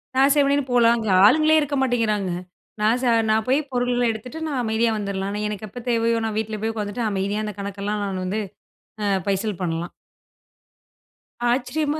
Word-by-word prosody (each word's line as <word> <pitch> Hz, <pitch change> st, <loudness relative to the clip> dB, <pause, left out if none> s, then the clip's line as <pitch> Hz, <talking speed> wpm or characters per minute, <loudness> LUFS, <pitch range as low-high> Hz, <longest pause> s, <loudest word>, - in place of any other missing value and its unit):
நான் 270 Hz, +2 st, +5 dB
செவனேன்னு 285 Hz, 0 st, +3 dB
போலாம், 235 Hz, -1 st, +4 dB
அங்க 220 Hz, -2 st, -3 dB, 0.2 s
ஆளுங்களே 310 Hz, +7 st, +5 dB
இருக்க 290 Hz, -1 st, -1 dB
மாட்டேங்கிறாங்க. 220 Hz, -7 st, 0 dB, 0.5 s
நான் 220 Hz, +4 st, +3 dB
ச -, -, -1 dB, 0.2 s
நான் 220 Hz, 0 st, +2 dB
போய் 265 Hz, +3 st, +3 dB
பொருள்கள 245 Hz, -1 st, 0 dB
எடுத்துட்டு, 245 Hz, +8 st, -7 dB
நான் 275 Hz, -5 st, -1 dB
அமைதியா 225 Hz, +1 st, +1 dB
வந்துரலாம், 200 Hz, -1 st, -3 dB
ஆனா 205 Hz, +1 st, -3 dB
எனக்கு 210 Hz, 0 st, -5 dB
எப்ப 245 Hz, +5 st, -8 dB
தேவையோ! 230 Hz, -1 st, +2 dB
நான் 215 Hz, -1 st, -2 dB
வீட்ல 220 Hz, -1 st, -4 dB
போய் 225 Hz, 0 st, -1 dB
உட்காந்துட்டு 210 Hz, +2 st, -3 dB
அமைதியா 200 Hz, +2 st, -1 dB
அந்த 210 Hz, -, -4 dB
கணக்கெல்லாம் 200 Hz, +1 st, -3 dB
நான் 190 Hz, -2 st, -3 dB
வந்து 195 Hz, +4 st, -1 dB, 0.7 s
அ -, -, +1 dB, 0.2 s
பைசல் 200 Hz, 0 st, -1 dB
பண்லாம். 170 Hz, 0 st, -3 dB, 1.6 s
ஆச்சரியமா 290 Hz, +5 st, 0 dB
220 Hz, 165 wpm, -23 LUFS, 205-250 Hz, 1.6 s, நான்